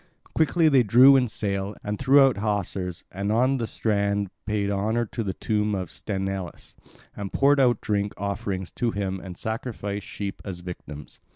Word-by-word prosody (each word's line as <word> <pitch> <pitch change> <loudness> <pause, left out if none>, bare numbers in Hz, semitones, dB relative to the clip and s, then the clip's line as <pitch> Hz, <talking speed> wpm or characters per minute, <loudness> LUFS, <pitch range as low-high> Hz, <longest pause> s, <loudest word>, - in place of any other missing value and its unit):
Quickly 160 +1 +3
they 140 -4 +5
drew 125 +5 +7
in 130 -2 +3
sail 100 -2 -2
and 105 0 -3
threw 135 +2 +6
out 135 -4 +4
hawsers, 100 -4 -2
and 100 +3 -2
on 130 +4 +3
the 115 -3 -2
strand 100 -3 0 0.2
paid 105 -2 0
honour 110 +4 0
to 115 +1 -4
the 95 -3 -3
tomb 105 -1 0
of 90 -4 -4
Sthenelus, 95 -3 -5 0.4
and 100 -2 -5
poured 140 +1 +4
out 125 -3 +3
drink 100 -1 -1
offerings 100 -2 -3
to 120 - -1
him 95 -3 -3
and 90 -1 -9
sacrificed 110 -3 -4
sheep 100 -1 -5
as 90 -3 -6
victims. 75 -5 -9
105 Hz, 170 wpm, -25 LUFS, 95-120 Hz, 0.4 s, drew